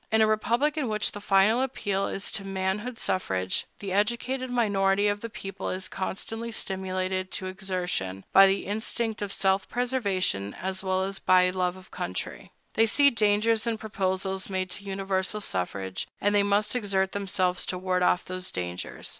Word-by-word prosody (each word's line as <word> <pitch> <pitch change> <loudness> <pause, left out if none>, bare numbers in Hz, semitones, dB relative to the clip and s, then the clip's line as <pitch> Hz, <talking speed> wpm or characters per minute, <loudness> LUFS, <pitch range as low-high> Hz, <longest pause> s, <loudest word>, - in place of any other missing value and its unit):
In 220 - +4
a - - +6
republic 235 +8 +1
in 270 -6 0
which 215 -1 +1
the 205 - -8
final 205 +5 +4
appeal 205 -7 -1
is 195 - -3
to 195 - -1
manhood 195 +5 -2
suffrage, 95 - -1
the 195 -2 -5
educated 240 +6 0
minority 200 -4 +2
of 205 0 0
the 230 - -5
people 195 -3 -5
is 185 +1 -3
constantly 225 +4 -4
stimulated 185 -2 -2
to 190 - -2
exertion, 180 - -3
by 195 0 +9
the 195 +1 0
instinct 220 +2 -2
of 205 -1 -3
self 190 0 +1
preservation 200 - 0
as 190 +1 -4
well 190 0 +1
as 195 0 -3
by 180 0 +5
love 180 -1 0
of 185 0 -15
country. 90 +1 -5 0.2
They 225 +1 +4
see 280 +5 +6
dangers 220 0 +2
in 230 -1 0
proposals 190 -3 -2
made 185 -1 -2
to 195 - -5
universal 195 +1 -1
suffrage, 95 - -3
and 205 +1 +2
they 205 - +5
must 205 +2 +2
exert 195 -5 +1
themselves 185 -2 0
to 180 - -1
ward 185 0 0
off 180 0 +3
those 185 0 -4
dangers. 90 0 -5
195 Hz, 170 wpm, -27 LUFS, 185-215 Hz, 0.2 s, by